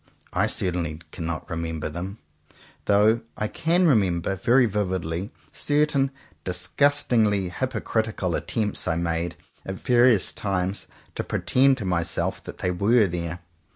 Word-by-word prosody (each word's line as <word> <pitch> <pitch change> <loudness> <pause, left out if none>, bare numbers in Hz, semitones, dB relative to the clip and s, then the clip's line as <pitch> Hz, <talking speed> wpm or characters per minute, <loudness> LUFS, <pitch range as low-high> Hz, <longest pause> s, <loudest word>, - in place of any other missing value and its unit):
I - - +2
certainly 85 -4 0
cannot 85 -2 -4
remember 80 -2 -3
them; 90 +6 -6 0.7
though 105 +3 +4 0.2
I 105 - -1
can 170 +9 +1
remember 95 - +2
very 120 +7 +4
vividly 95 -3 -2 0.2
certain 145 -2 +2 0.3
disgust 95 +11 +2
ingly 105 -6 +2
hypocritical 110 -6 -2
attempts 105 +1 -1
I 80 - +1
made 85 0 -1 0.3
at 95 - -5
various 120 -1 +3
times 95 -1 -2 0.3
to - - -3
pretend 135 +1 +2
to 110 - -4
myself 85 -2 -1
that - - -8
they 90 - -1
were 105 +5 +3
there. 85 -1 -4
95 Hz, 125 wpm, -25 LUFS, 85-115 Hz, 0.7 s, though